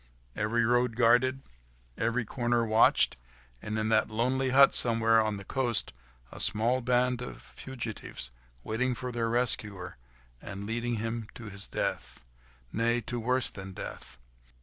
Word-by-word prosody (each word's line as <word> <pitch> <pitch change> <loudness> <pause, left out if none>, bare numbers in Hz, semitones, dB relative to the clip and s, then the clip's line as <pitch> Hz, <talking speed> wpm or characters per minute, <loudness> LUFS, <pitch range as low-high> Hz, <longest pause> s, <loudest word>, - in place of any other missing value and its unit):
Every 115 +2 +1
road 120 0 +2
guarded, 125 +3 +3 0.5
every 115 +1 -1
corner 120 0 0
watched, 110 - +4 0.4
and 105 +1 -4
in 110 0 -1
that 110 -1 +2
lonely 130 +4 0
hut 135 +2 +6
somewhere 115 -1 +4
on 110 -1 -1
the 100 - -9
coast, 120 -3 -1 0.4
a - - -9
small 120 +4 +3
band 125 0 +1
of 125 - -7
fugitives 115 - -6 0.3
waiting 125 +3 -1
for 125 +1 -5
their 115 -1 -1
rescuer, 105 - -1 0.4
and 100 +1 -7
leading 120 +2 -2
him 115 0 -4
to 110 -3 -8
his 100 0 -2
death—nay! - - -4
to 120 +2 -3
worse 125 +2 +1
than 95 -1 -9
death. 65 - -8
115 Hz, 140 wpm, -29 LUFS, 110-125 Hz, 0.5 s, hut